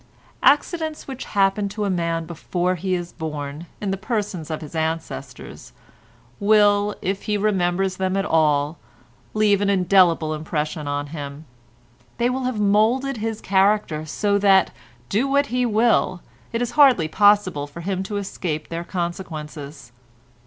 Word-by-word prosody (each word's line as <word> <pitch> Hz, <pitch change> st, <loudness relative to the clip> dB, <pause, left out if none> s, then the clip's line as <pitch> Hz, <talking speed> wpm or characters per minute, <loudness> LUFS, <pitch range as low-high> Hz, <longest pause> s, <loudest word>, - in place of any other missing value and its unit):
Accidents 315 Hz, +1 st, +1 dB
which 265 Hz, -2 st, -6 dB
happen 200 Hz, 0 st, +1 dB
to 205 Hz, +1 st, -3 dB
a -, -, 0 dB
man 170 Hz, -2 st, -1 dB
before 175 Hz, +2 st, -2 dB
he 185 Hz, +1 st, -1 dB
is 175 Hz, -1 st, -5 dB
born, 150 Hz, 0 st, -6 dB
in 200 Hz, -2 st, -2 dB
the 195 Hz, -, -1 dB
persons 200 Hz, -6 st, -3 dB
of 155 Hz, 0 st, -4 dB
his 155 Hz, 0 st, -9 dB
ancestors, 160 Hz, 0 st, -5 dB, 0.7 s
will, 205 Hz, 0 st, +4 dB
if 195 Hz, +2 st, -1 dB
he 210 Hz, -1 st, 0 dB
remembers 190 Hz, -2 st, 0 dB
them 190 Hz, 0 st, 0 dB
at 195 Hz, -, 0 dB
all, 150 Hz, -2 st, +2 dB, 0.6 s
leave 210 Hz, -2 st, +3 dB
an 200 Hz, -, +1 dB
indelible 180 Hz, -4 st, +3 dB
impression 155 Hz, 0 st, -3 dB
on 145 Hz, 0 st, -2 dB
him; 145 Hz, 0 st, -7 dB, 0.7 s
they 240 Hz, +1 st, +1 dB
will 260 Hz, 0 st, -2 dB
have 250 Hz, -4 st, -2 dB
moulded 225 Hz, +6 st, +2 dB
his 220 Hz, 0 st, -3 dB
character 195 Hz, -5 st, +2 dB
so 200 Hz, +6 st, 0 dB
that, 195 Hz, -1 st, +4 dB, 0.4 s
do 230 Hz, +7 st, +1 dB
what 280 Hz, +1 st, +2 dB
he 250 Hz, -1 st, +2 dB
will, 220 Hz, -5 st, +2 dB, 0.3 s
it 230 Hz, +1 st, -1 dB
is 245 Hz, -, -3 dB
hardly 265 Hz, -, +5 dB
possible 195 Hz, -5 st, +3 dB
for 155 Hz, +4 st, -10 dB
him 190 Hz, +1 st, -2 dB
to 205 Hz, +2 st, -4 dB
escape 175 Hz, -6 st, -4 dB
their 170 Hz, +1 st, -4 dB
consequences. 155 Hz, -7 st, -6 dB
190 Hz, 150 wpm, -22 LUFS, 160-210 Hz, 0.7 s, hardly